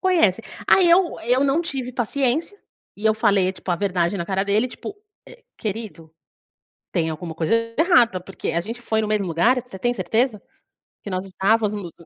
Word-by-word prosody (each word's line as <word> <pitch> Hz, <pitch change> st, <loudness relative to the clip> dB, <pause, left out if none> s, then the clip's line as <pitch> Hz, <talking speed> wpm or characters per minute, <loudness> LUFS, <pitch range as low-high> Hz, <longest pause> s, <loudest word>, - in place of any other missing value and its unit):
conhece. 330 Hz, -, +3 dB, 0.3 s
Aí, 365 Hz, -3 st, +5 dB
eu 350 Hz, 0 st, +3 dB
eu 250 Hz, +4 st, +2 dB
não 280 Hz, +4 st, +2 dB
tive 265 Hz, -7 st, -4 dB
paciência, 270 Hz, -, -1 dB, 0.4 s
e 210 Hz, -, -10 dB
eu 215 Hz, -, +4 dB
falei, 200 Hz, -4 st, +2 dB
tipo, 185 Hz, -, -7 dB
a 175 Hz, -, +2 dB
verdade 180 Hz, -1 st, 0 dB
na 170 Hz, -, -3 dB
cara 195 Hz, +1 st, 0 dB
dele, 210 Hz, +4 st, +2 dB
tipo, 400 Hz, +10 st, -8 dB, 0.3 s
eh: -, -, -15 dB
"Querido, 205 Hz, -7 st, -6 dB, 0.8 s
tem 160 Hz, -1 st, 0 dB
alguma 160 Hz, +1 st, -6 dB
coisa 165 Hz, +5 st, 0 dB, 0.2 s
errada 245 Hz, -, +4 dB
porque 185 Hz, 0 st, -5 dB
a 170 Hz, -, +1 dB
gente 230 Hz, +6 st, -7 dB
foi 220 Hz, -1 st, 0 dB
no 215 Hz, -, -2 dB
mesmo 210 Hz, -2 st, 0 dB
lugar? 225 Hz, +10 st, +2 dB
Você 195 Hz, -6 st, -11 dB
tem 240 Hz, +4 st, 0 dB
certeza, 225 Hz, -2 st, 0 dB, 0.6 s
que -, -, -6 dB
nós 185 Hz, 0 st, -3 dB
estávamos 200 Hz, -1 st, 0 dB
215 Hz, 180 wpm, -22 LUFS, 185-250 Hz, 0.8 s, Aí